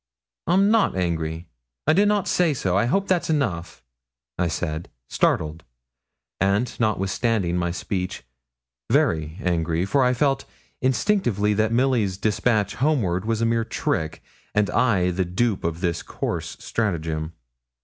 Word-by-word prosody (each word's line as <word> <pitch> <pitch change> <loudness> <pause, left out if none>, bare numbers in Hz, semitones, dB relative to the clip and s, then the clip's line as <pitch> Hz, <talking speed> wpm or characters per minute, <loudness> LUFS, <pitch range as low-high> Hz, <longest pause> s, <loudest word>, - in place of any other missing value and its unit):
'I'm 195 +4 +4
not 225 - +3
angry. 85 -2 -2 0.4
I - - +4
did 200 +5 +4
not 205 -2 +1
say 170 -5 +2
so. 95 -7 0
I 100 - +3
hope 195 +11 +1
that's 180 -3 +1
enough,' 85 - -1 0.5
I 90 - 0
said, 80 -1 -3 0.2
startled; 80 +1 0 0.8
and, 100 +6 +1
notwithstanding 105 -3 0
my 85 -1 0
speech, 90 +1 -3 0.7
very 80 +1 +1
angry, 85 -1 0
for 135 +7 +2
I 125 0 +3
felt 135 +1 +1 0.4
instinctively 125 - +1
that 110 +2 +1
Milly's 115 -6 +2
despatch 105 0 +1
homeward 110 - +1
was 115 0 0
a - - +3
mere 115 0 +2
trick, 80 -7 -2 0.3
and 105 -1 +2
I 95 -8 +2
the 95 +1 0
dupe 95 +4 0
of 85 +1 -2
this 85 -3 0
coarse - - -4
stratagem. 80 -7 -2
100 Hz, 140 wpm, -24 LUFS, 85-125 Hz, 0.8 s, I'm